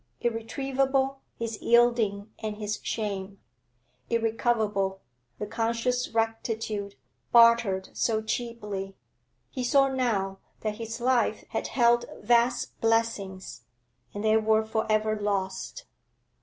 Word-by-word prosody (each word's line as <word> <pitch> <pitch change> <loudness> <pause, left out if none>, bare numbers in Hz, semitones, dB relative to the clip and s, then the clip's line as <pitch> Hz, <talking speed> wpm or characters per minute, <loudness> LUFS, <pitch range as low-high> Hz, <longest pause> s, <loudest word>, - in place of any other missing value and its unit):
Irretrievable, 270 +3 0 0.2
his 230 -2 -4
yielding 230 -3 +3
and 215 -1 -4
his 210 0 -3
shame; 200 -3 -3 0.7
irrecoverable, 220 -4 0 0.4
the 210 - -3
conscious 235 +3 -1
rectitude 225 -2 -2 0.4
bartered 230 -5 +5
so 220 -2 +1
cheaply. 210 -4 -4 0.6
He 255 - -3
saw 275 +2 +4
now 210 -7 -1 0.2
that 215 -1 -2
his 230 0 -5
life 240 -3 +2
had - - -2
held 240 0 +3
vast 240 +1 +1
blessings, 225 -4 -1 0.5
and 205 - -5
they 220 0 +4
were 220 0 +2
for 220 0 -1
ever 215 0 +1
lost. 200 - -2
225 Hz, 105 wpm, -27 LUFS, 210-235 Hz, 0.7 s, bartered